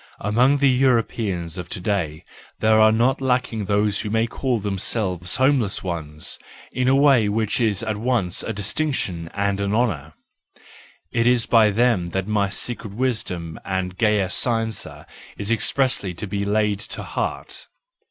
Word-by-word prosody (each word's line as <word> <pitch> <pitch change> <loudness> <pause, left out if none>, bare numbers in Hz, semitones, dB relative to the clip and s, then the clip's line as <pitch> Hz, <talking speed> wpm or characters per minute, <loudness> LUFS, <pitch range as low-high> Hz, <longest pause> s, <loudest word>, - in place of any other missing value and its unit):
—Among 125 +7 +3
the 140 0 +3
Europeans 115 -9 +1
of 90 -1 -7
to - - -5
day 90 -6 -2 0.3
there 110 0 +4
are 110 0 +6
not 120 +5 +2
lacking 125 -5 0
those 105 0 +1
who 105 - -3
may 110 +1 +2
call 125 0 -1
themselves 95 -3 -2
homeless 130 -7 +1
ones 80 -4 -4 0.3
in 125 0 -1
a 130 - +5
way 135 -7 +4
which 110 +2 0
is 110 -3 +2
at 110 -2 -2
once 110 -6 0
a - - -3
distinction 100 - -2
and 100 -1 0
an 100 +1 0
honour; 85 - -1 1.0
it 115 0 +1
is 125 -2 +3
by 110 -2 +5
them 105 -4 +2
that 95 - -1
my 105 -2 +1
secret 110 0 -5
wisdom 105 -10 -2
and 95 -1 -3
gaya 105 -3 +2
scienza 115 -2 -1 0.3
is 105 +2 -2
expressly 115 -5 +1
to 95 - -5
be 100 0 -3
laid 105 0 +1
to 105 - -5
heart. - - -4
105 Hz, 155 wpm, -22 LUFS, 95-120 Hz, 1.0 s, are